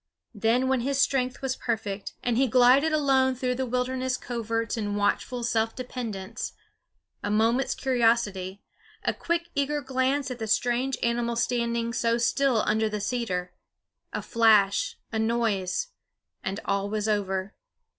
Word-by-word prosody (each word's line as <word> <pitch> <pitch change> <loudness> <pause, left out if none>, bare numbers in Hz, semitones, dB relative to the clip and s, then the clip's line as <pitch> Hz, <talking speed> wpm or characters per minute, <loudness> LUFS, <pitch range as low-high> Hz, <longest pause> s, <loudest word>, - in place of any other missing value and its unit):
Then 230 +4 +2
when 265 -1 +2
his 270 +3 -1
strength 270 -2 +1
was 265 -1 0
perfect, 210 -4 -3
and 240 -2 +1
he 265 +3 +3
glided 255 +6 +5
alone 270 -4 +3
through 250 0 -1
the 260 +1 -2
wilderness 255 +1 -1
coverts 230 -2 -2
in 205 -3 -2
watchful 205 +4 0
self 225 -1 0
dependence 230 -4 -5 0.7
a 205 - -3
moment's 225 +5 +2
curiosity, 225 -7 +1 0.4
a - - +1
quick 340 0 -2
eager 290 +1 0
glance 265 0 0
at 250 - -6
the 220 - -3
strange 245 +4 +1
animal 235 0 0
standing 235 -1 0
so 230 +1 +1
still 240 0 +2
under 220 0 +1
the 210 0 -3
cedar, 200 -5 -2 0.6
a - - -4
flash, 215 -4 +3
a 220 - -1
noise; 225 - 0 0.5
and 190 +1 -3
all 200 0 0
was 215 0 -1
over. 195 -2 -1
235 Hz, 145 wpm, -27 LUFS, 215-255 Hz, 0.7 s, glided